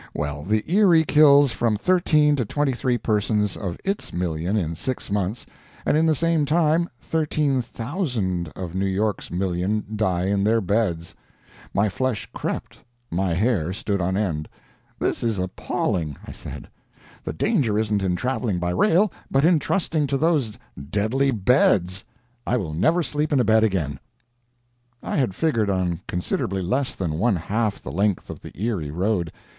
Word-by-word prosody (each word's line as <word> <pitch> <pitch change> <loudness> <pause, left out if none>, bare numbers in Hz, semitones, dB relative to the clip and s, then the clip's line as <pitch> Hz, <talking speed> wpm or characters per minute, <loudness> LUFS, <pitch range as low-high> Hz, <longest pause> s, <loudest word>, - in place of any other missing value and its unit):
Well, 75 0 -3
the 105 +6 0
Erie 180 -3 +5
kills 145 -3 +6
from 110 -1 0
13 150 - +3
to 125 - +1
23 130 0 0
persons 105 -3 0
of 90 -4 -4
its 195 +1 -2
million 85 +3 -1
in 85 -4 -1
six 130 +3 -4
months; 100 +3 -1 0.4
and - - +2
in 160 +1 +3
the 155 - +3
same 165 0 +2
time 160 +2 +2
13,000 130 - -1
of 90 -3 -6
New 95 +1 0
York's 100 +2 -1
million 95 +3 -1
die 95 -4 0
in 100 0 +1
their 110 +2 +3
beds! 95 -5 -1 0.6
My 100 +2 +2
flesh 110 +4 -2
crept, - - -4 0.3
my 90 0 0
hair 95 -4 +1
stood 100 -1 -2
on 95 +2 0
end. 80 -8 -2 0.5
"This - - -1
is 115 -3 0
appalling!" 90 -4 -2
I - - -8
said. - - -8 0.6
"The - - -3
danger 110 -7 +1
isn't 105 -2 +1
in 90 -2 0
traveling 120 -2 -1
by 90 0 -1
rail, 195 - +3 0.2
but 135 +2 +3
in 170 -2 +5
trusting 160 -4 0
to 135 - 0
those 145 -7 +1 0.4
deadly 110 - +1
beds. 95 -5 +2 0.4
I 125 - +2
will 85 -9 -3
never 160 - +2
sleep 150 0 -2
in 140 - +3
a - - +4
bed 110 0 +4
again." 80 -10 0 1.0
I - - -2
had 125 -10 0
figured 115 -10 +1
on 90 -3 -1
considerably 95 +2 -2
less 130 +9 -1
than 80 -4 -2
one 115 0 +3
half 105 +5 -1
the - - -6
length 100 -1 0
of - - -9
the - - -12
Erie 100 -9 -2
road. 90 +1 -1
105 Hz, 160 wpm, -23 LUFS, 90-135 Hz, 1.0 s, kills